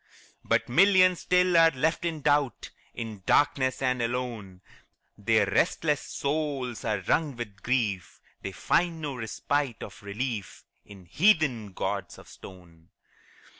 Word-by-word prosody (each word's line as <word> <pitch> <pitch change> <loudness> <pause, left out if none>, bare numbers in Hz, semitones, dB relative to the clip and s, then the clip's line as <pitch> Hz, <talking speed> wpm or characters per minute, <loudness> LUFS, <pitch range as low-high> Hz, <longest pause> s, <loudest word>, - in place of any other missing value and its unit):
But - - +1
millions 185 +5 +5
still 180 0 +2
are 165 0 +7
left 160 +4 -1
in 160 -3 -3
doubt, 145 -4 0 0.2
In 110 -4 -6
darkness 135 -2 +2
and 125 -1 +1
alone; 115 -6 -4 0.5
Their 110 0 +2
restless 150 - +1
souls 140 -5 -3
are 105 -3 -1
wrung 145 - 0
with 105 -5 -8
grief, 110 -7 -1 0.2
They 95 - -5
find 165 - 0
no 150 -3 -4
respite 125 +2 -2
or - - -8
relief 105 0 -5 0.2
In 95 -3 -14
heathen 135 - +2
gods - - -4
of - - -15
stone. 85 -3 -14
125 Hz, 130 wpm, -27 LUFS, 105-150 Hz, 0.5 s, are